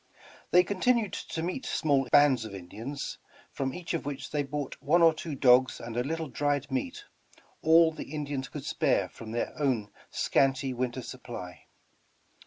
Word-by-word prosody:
They 180 +1 +6
continued 205 +2 +1
to 160 - -4
meet 185 +10 -3
small 140 -4 +1
bands 145 -5 +5
of 105 -3 -7
Indians, 110 +10 -6 0.3
from 135 -1 -2
each 175 +4 -5
of 165 - -1
which 140 -1 -5
they 150 - +1
bought 145 0 -5
one 165 +5 +4
or 165 -1 +7
two 155 -1 -5
dogs 130 0 +5
and 115 -1 -7
a 120 - +1
little 160 +3 -3
dried 145 +1 -1
meat, 260 - -3 0.6
all 160 +1 +6
the 155 - -8
Indians 145 -3 -3
could - - -7
spare - - +1
from 110 -1 -10
their 120 - -2
own 120 -8 0 0.2
scanty 135 -1 +1
winter 125 0 -3
supply. 120 -9 -8
140 Hz, 165 wpm, -29 LUFS, 125-160 Hz, 0.6 s, or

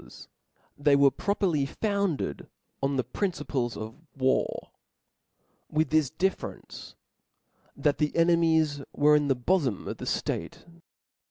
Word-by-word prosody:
^S^ - - -14 0.2
* - - -39
They 145 -1 +6
were 140 -1 +5
properly 175 - 0
founded 200 - -2 0.3
on 135 0 0
the 130 - +1
principles 135 - -2
of 110 +1 -5
chap/16; 155 +1 -25
war, 130 0 0 1.0
with 155 -1 0
this 155 -4 +3
difference, 185 +6 -4 0.8
that 145 +1 +1
the 150 -1 +1
enemies 165 -3 +3
were 150 +1 +5
in 145 -1 +2
the 135 - +2
bofom 130 - 0
of - - -4
the - - -2
(late. - - -8
150 Hz, 135 wpm, -27 LUFS, 135-170 Hz, 1.0 s, They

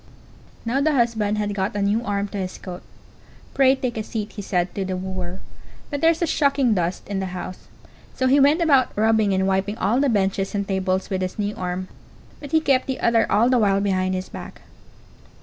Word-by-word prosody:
Now 250 +4 0
the 310 +1 +2
husband 225 -5 +1
had 205 -1 -1
got 195 0 -2
a 205 - -1
new 210 +4 +1
arm 200 -2 -1
to 200 - -5
his 185 -1 -4
coat. 180 -1 -8 0.7
"Pray, 265 -1 +4
take 250 -3 -3
a 220 - -2
seat," 215 -1 -5
he 210 - -7
said 180 -2 -1
to 195 - -2
the 185 -1 -3
wooer; 185 0 -5 0.5
"but 285 -1 -3
there's 330 +1 +3
a - - +4
shocking 280 -6 +2
dust 175 -2 -2
in 200 -1 -2
the 185 -1 -4
house." 185 0 -8 0.5
So 260 - 0
he 270 +2 +5
went 295 +5 +4
about 275 -9 +3
rubbing 220 -1 +3
and 190 0 +1
wiping 195 +2 0
all 225 +4 +1
the 280 0 +2
benches 195 -2 0
and 200 -1 -1
tables 190 -1 -1
with 190 -1 -1
his 185 0 -3
new 205 0 -2
arm, 180 0 -4 0.5
but 285 -1 -9
he 320 - +3
kept 270 -4 +2
the 265 - -3
other 230 -1 +2
all 215 +4 +4
the 255 -1 +3
while 200 -2 +3
behind 185 -2 0
his 185 0 -4
back. - - -10
205 Hz, 215 wpm, -23 LUFS, 190-255 Hz, 0.7 s, he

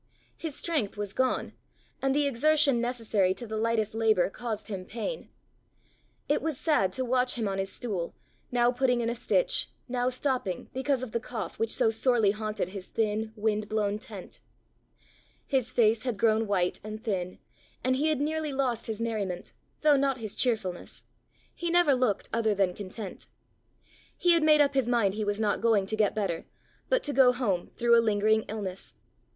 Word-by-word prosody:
His 320 -4 -5
strength 290 - -2
was 205 -1 -4
gone, 260 -1 0 0.5
and 270 0 +1
the 295 0 +3
exertion 280 -1 +3
necessary 225 -6 +1
to 240 - -8
the 220 -1 -5
lightest 220 -1 0
labour 220 -5 +2
caused 220 -3 -5
him 195 -4 -5
pain. 235 - -5 1.0
It 295 - +1
was 315 -4 -2
sad 295 - +2
to 260 - -2
watch 250 0 +1
him 225 -4 -1
on 195 0 -2
his 195 0 -2
stool, 195 -8 -4 0.4
now 240 0 +3
putting 250 -1 +1
in 230 0 0
a - - -1
stitch, - - +1 0.2
now 250 0 0
stopping 255 -8 -2
because 265 0 0
of 250 - -6
the 235 - -1
cough 220 -6 -6
which 225 - +1
so 220 - +3
sorely 225 -2 +3
haunted 215 -3 -3
his 190 -1 -7
thin, 220 0 -1
wind 210 -1 -1
blown 210 -1 0
tent. 215 -6 -10 1.0
His 255 -2 0
face 225 -2 +3
had 245 -5 -2
grown 220 0 +2
white 180 -3 0
and 215 +1 -7
thin, 185 -5 -2 0.5
and 255 0 +2
he 290 +4 +1
had 310 -3 +1
nearly 310 +1 -1
lost 260 -4 -1
his 220 -1 -3
merriment, 205 -6 -3 0.3
though 300 -2 +5
not 275 -1 +1
his 215 -4 -5
cheerfulness; 220 -8 -2 0.5
he 345 - -3
never 345 -4 +4
looked 250 -6 0
other 220 -2 +2
than 190 -2 +2
content. 200 +1 -7 0.9
He 355 - +3
had 335 -1 +4
made 305 -1 +6
up 285 -1 +3
his 265 -3 +1
mind 230 -6 +2
he 215 +1 -2
was 205 0 -1
not 210 -2 0
going 220 -4 +3
to 220 - -3
get 210 -2 +1
better, 195 -6 -2 0.4
but - - +2
to 290 - -2
go 260 -2 +6
home 215 -8 -1
through 235 0 +4
a 230 - +6
lingering 215 0 +2
illness. 195 -3 -6
230 Hz, 180 wpm, -28 LUFS, 210-260 Hz, 1.0 s, made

